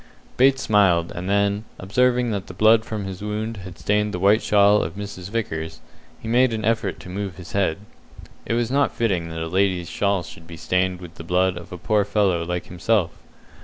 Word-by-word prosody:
Bates 135 Hz, +1 st, +4 dB
smiled, 95 Hz, -6 st, +3 dB
and 90 Hz, +2 st, -5 dB
then, 100 Hz, +1 st, +1 dB
observing 125 Hz, +5 st, +1 dB
that 100 Hz, -2 st, -3 dB
the 90 Hz, -, -10 dB
blood 110 Hz, +3 st, +5 dB
from 110 Hz, -3 st, -5 dB
his 95 Hz, -1 st, -7 dB
wound 105 Hz, +2 st, -3 dB
had 95 Hz, -2 st, -9 dB
stained 105 Hz, 0 st, 0 dB
the -, -, -3 dB
white 100 Hz, +4 st, +4 dB
shawl 105 Hz, 0 st, +4 dB
of 80 Hz, -, -4 dB
Mrs. 100 Hz, -2 st, -7 dB
Vickers, 80 Hz, -8 st, -4 dB, 0.4 s
he -, -, -9 dB
made 120 Hz, +1 st, +3 dB
an 110 Hz, -1 st, -3 dB
effort 110 Hz, -4 st, 0 dB
to -, -, -11 dB
move 95 Hz, 0 st, -4 dB
his 90 Hz, 0 st, -11 dB
head. 95 Hz, -5 st, +1 dB, 0.7 s
It 115 Hz, -, -1 dB
was 120 Hz, 0 st, 0 dB
not 140 Hz, +1 st, +1 dB
fitting 95 Hz, -8 st, 0 dB
that 80 Hz, 0 st, -4 dB
a -, -, -3 dB
lady's 90 Hz, 0 st, 0 dB
shawl 100 Hz, -3 st, 0 dB
should 80 Hz, -1 st, -12 dB
be 85 Hz, 0 st, -9 dB
stained 90 Hz, +1 st, 0 dB
with 85 Hz, -2 st, -10 dB
the -, -, -8 dB
blood 90 Hz, +2 st, +1 dB
of 85 Hz, -1 st, -10 dB
a 90 Hz, -, -6 dB
poor 105 Hz, +4 st, +1 dB
fellow 100 Hz, -4 st, +1 dB
like 90 Hz, +1 st, -3 dB
himself. 95 Hz, 0 st, 0 dB
100 Hz, 205 wpm, -23 LUFS, 90-110 Hz, 0.7 s, blood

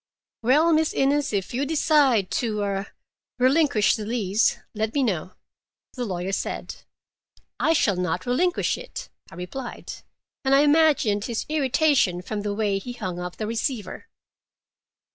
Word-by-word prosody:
"Well, 300 Hz, +8 st, +4 dB
Miss 315 Hz, 0 st, +2 dB
Innes, 285 Hz, +1 st, +1 dB
if 200 Hz, 0 st, -2 dB
you 260 Hz, +4 st, 0 dB
decide 285 Hz, -, +3 dB
to—er—relinquish 220 Hz, +5 st, 0 dB
the 215 Hz, -, -5 dB
lease, 215 Hz, -2 st, +1 dB, 0.2 s
let 220 Hz, +2 st, -2 dB
me 280 Hz, -, +2 dB
know," 185 Hz, -6 st, -2 dB, 0.6 s
the 250 Hz, -2 st, -3 dB
lawyer 185 Hz, -2 st, -3 dB
said. -, -, -4 dB, 0.8 s
"I 325 Hz, -, +3 dB
shall 205 Hz, -, +2 dB
not 180 Hz, 0 st, -2 dB
relinquish 345 Hz, +9 st, +1 dB
it," -, -, -8 dB, 0.2 s
I -, -, -13 dB
replied, 180 Hz, +9 st, -7 dB, 0.5 s
and 270 Hz, 0 st, +4 dB
I 275 Hz, -, +6 dB
imagined 290 Hz, -9 st, +3 dB
his 235 Hz, -3 st, -3 dB
irritation 275 Hz, -, +2 dB
from 210 Hz, +3 st, -4 dB
the 205 Hz, 0 st, -3 dB
way 205 Hz, -2 st, 0 dB
he 245 Hz, +5 st, -7 dB
hung 185 Hz, -7 st, -5 dB
up 180 Hz, 0 st, -5 dB
the 215 Hz, -, -3 dB
receiver. 230 Hz, -, -3 dB
235 Hz, 140 wpm, -24 LUFS, 200-285 Hz, 0.8 s, I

